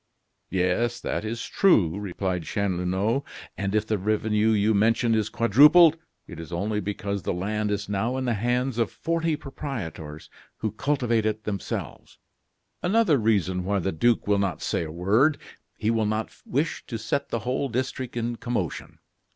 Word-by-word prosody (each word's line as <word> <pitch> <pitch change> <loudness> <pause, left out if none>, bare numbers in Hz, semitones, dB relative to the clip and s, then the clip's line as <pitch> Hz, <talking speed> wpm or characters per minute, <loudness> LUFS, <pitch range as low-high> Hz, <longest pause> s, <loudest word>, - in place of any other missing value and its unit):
"Yes, 95 +6 0
that - - -3
is 115 +2 -4
true," 100 - +3
replied 95 -2 -2
Chanlouineau; 100 +5 0 0.3
"and 100 0 -2
if 110 0 +2
the 110 -2 -1
revenue 105 +2 +1
you 110 0 +3
mention 115 +3 +3
is 110 -1 +1
quadrupled, 150 - +6 0.3
it - - -10
is 80 0 -8
only 105 +5 -1
because 100 0 -3
the - - -2
land 105 +3 -1
is 100 0 -2
now 105 +6 -1
in 130 - -2
the 120 - +1
hands 120 +3 0
of 115 - +2
forty 165 -1 -1
proprietors 95 - -7 0.3
who 110 - -2
cultivate 120 -2 0
it 110 0 -2
themselves." 100 -4 -5 0.6
"Another 185 - +3
reason 95 -5 +1
why 100 +2 0
the 95 +1 -1
duke 115 +8 +2
will 100 -1 +2
not 95 -5 -1
say - - -1
a 80 - -7
word; 105 - +2 0.4
he 110 - 0
will 110 -2 +1
not 110 +1 -2
wish 145 +5 -1
to 115 - -4
set 110 +6 -2
the - - -1
whole 130 +2 -1
district 130 0 -3
in 120 0 -2
commotion. 115 -10 -4
110 Hz, 165 wpm, -25 LUFS, 100-120 Hz, 0.6 s, quadrupled